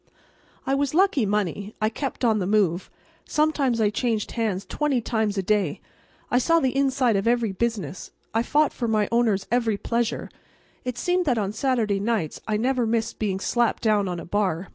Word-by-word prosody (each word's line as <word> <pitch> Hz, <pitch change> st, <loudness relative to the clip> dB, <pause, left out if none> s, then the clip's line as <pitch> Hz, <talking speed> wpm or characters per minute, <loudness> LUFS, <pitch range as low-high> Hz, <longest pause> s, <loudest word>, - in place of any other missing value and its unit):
I 270 Hz, -, 0 dB
was 280 Hz, +1 st, 0 dB
lucky 350 Hz, -, +3 dB
money. 205 Hz, 0 st, -2 dB
I 215 Hz, -, +2 dB
kept 265 Hz, +2 st, -3 dB
on 220 Hz, -2 st, +3 dB
the 180 Hz, -, -1 dB
move. 195 Hz, -4 st, +1 dB, 0.4 s
Sometimes 295 Hz, -6 st, +1 dB
I 210 Hz, -2 st, +3 dB
changed 225 Hz, -2 st, -1 dB
hands 210 Hz, -5 st, -2 dB
twenty 295 Hz, -4 st, 0 dB
times 220 Hz, -3 st, -1 dB
a 195 Hz, -, 0 dB
day. 200 Hz, -5 st, 0 dB, 0.5 s
I 245 Hz, -, +4 dB
saw 330 Hz, +6 st, +3 dB
the 265 Hz, -3 st, 0 dB
inside 265 Hz, -4 st, +2 dB
of 195 Hz, +3 st, 0 dB
every 235 Hz, -3 st, +2 dB
business; 195 Hz, -4 st, -3 dB, 0.2 s
I 225 Hz, -, +2 dB
fought 295 Hz, +5 st, +2 dB
for 240 Hz, -, -3 dB
my 215 Hz, -2 st, +1 dB
owner's 220 Hz, -5 st, +2 dB
every 230 Hz, -4 st, +1 dB
pleasure. 235 Hz, +2 st, -2 dB, 0.5 s
It 250 Hz, -1 st, -4 dB
seemed 360 Hz, 0 st, +1 dB
that 255 Hz, -6 st, +2 dB
on 205 Hz, -2 st, -1 dB
Saturday 220 Hz, -4 st, 0 dB
nights 205 Hz, -7 st, -1 dB
I 215 Hz, -1 st, +1 dB
never 250 Hz, +1 st, +1 dB
missed 225 Hz, 0 st, -1 dB
being 195 Hz, -3 st, -1 dB
slapped 240 Hz, +4 st, 0 dB
down 210 Hz, -3 st, +2 dB
on 175 Hz, -1 st, -3 dB
a -, -, -8 dB
bar. 190 Hz, -2 st, -1 dB
225 Hz, 185 wpm, -24 LUFS, 205-250 Hz, 0.5 s, I